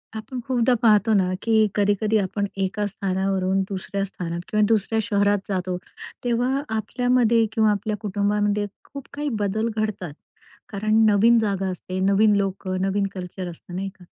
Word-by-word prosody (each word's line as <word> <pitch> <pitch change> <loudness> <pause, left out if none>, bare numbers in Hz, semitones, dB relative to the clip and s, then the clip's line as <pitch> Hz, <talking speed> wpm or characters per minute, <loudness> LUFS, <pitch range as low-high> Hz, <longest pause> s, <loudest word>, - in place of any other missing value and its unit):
आपण 220 +4 -6
खूपदा 255 -1 +2
पाहतो 215 -1 +5
ना 185 -3 +2
की 225 -1 +2 0.2
कधी-कधी 205 +1 +2
आपण 200 0 -1 0.2
एका 205 +2 -1
स्थानावरून 190 -1 -1
दुसऱ्या 195 0 -3
स्थानात 170 -3 -5
किंवा 210 0 +2
दुसऱ्या 225 0 +1
शहरात 205 -2 +2
जातो 185 -2 -1 0.5
तेव्हा 245 +3 +1
आपल्यामध्ये 235 +1 +2
किंवा 220 -2 +3
आपल्या 210 +1 -2
कुटुंबामध्ये 205 0 0 0.2
खूप 280 -2 -10
काही 295 +1 -2
बदल 210 +2 0
घडतात. 210 -7 -3 0.6
कारण 215 +1 0
नवीन 225 +3 +5
जागा 200 -3 -1
असते, 185 +1 -5
नवीन 200 +2 +4
लोकं, 195 -1 -1
नवीन 195 +1 +1
कल्चर 180 0 -6
असतं 175 +1 -10
नाही 195 +1 -3
का, - - -14
205 Hz, 150 wpm, -23 LUFS, 190-220 Hz, 0.6 s, पाहतो